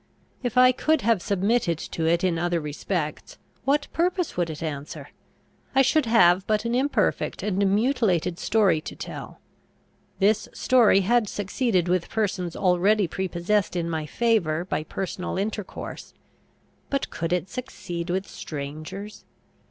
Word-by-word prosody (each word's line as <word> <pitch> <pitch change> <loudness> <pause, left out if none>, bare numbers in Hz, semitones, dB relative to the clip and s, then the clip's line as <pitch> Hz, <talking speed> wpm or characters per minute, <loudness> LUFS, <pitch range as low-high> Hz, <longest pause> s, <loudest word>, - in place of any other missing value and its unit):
If 245 -2 -3
I 255 0 +8
could 310 +3 +1
have 225 -4 +2
submitted 200 -2 +1
to 160 0 -3
it 170 +2 +2
in 175 -3 +1
other 175 0 0
respects, 150 +1 -4 0.3
what 285 +2 +2
purpose 355 0 0
would 175 -2 0
it 155 +1 -6
answer? 145 -2 -6 0.7
I 270 - +6
should 275 0 +2
have 190 -5 +5
but 215 +1 +1
an 235 - -1
imperfect 270 +4 0
and 200 -1 +1
mutilated 205 - +1
story 195 -8 +2
to - - -8
tell. - - -8 0.8
This 210 +2 +2
story 235 -6 +4
had 225 +2 +2
succeeded 200 -2 0
with 180 -1 0
persons 190 -5 -2
already 190 +2 +3
prepossessed 190 +3 -1
in 170 -1 -1
my 155 -2 -3
favour 180 -7 +1
by 155 - -2
personal 185 +1 -4
intercourse; 205 0 -5 0.7
but 275 -1 -2
could 165 0 -3
it 180 0 0
succeed 175 -6 -6
with 190 +2 -1
strangers? 155 +8 -7
190 Hz, 140 wpm, -25 LUFS, 170-230 Hz, 0.8 s, I